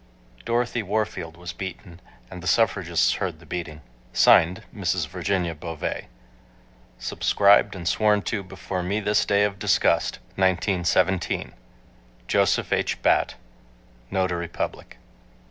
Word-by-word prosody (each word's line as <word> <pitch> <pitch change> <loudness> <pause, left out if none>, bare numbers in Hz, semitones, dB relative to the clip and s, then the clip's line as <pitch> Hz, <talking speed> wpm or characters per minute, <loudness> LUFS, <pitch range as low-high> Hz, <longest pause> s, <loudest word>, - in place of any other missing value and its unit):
Dorothy 120 0 0
Warfield 95 -5 -3
was 90 0 -7
beaten 90 -1 -8 0.3
and 90 -1 -8
the 90 - -6
suffragists 95 -7 +2
heard - - -2
the - - -16
beating. 80 -4 -6 0.3
(Signed) 85 +3 +5
MRS. - - -1
VIRGINIA 90 -4 -1
BOVEE. 80 0 -5 0.9
Subscribed 100 +6 +3
and 85 -2 -6
sworn 105 +1 +2
to 105 -4 -2
before 95 0 -5
me 95 +4 -1
this 105 0 +1
day 100 0 +3
of 100 -1 -1
disgust, - - +2 0.2
1917. 95 -1 +1 0.7
JOSEPH - - +2
H. - - -1
BATT, - - +2 0.7
Notary 90 -2 -1
Public. 85 - -5
95 Hz, 115 wpm, -24 LUFS, 85-100 Hz, 0.9 s, Signed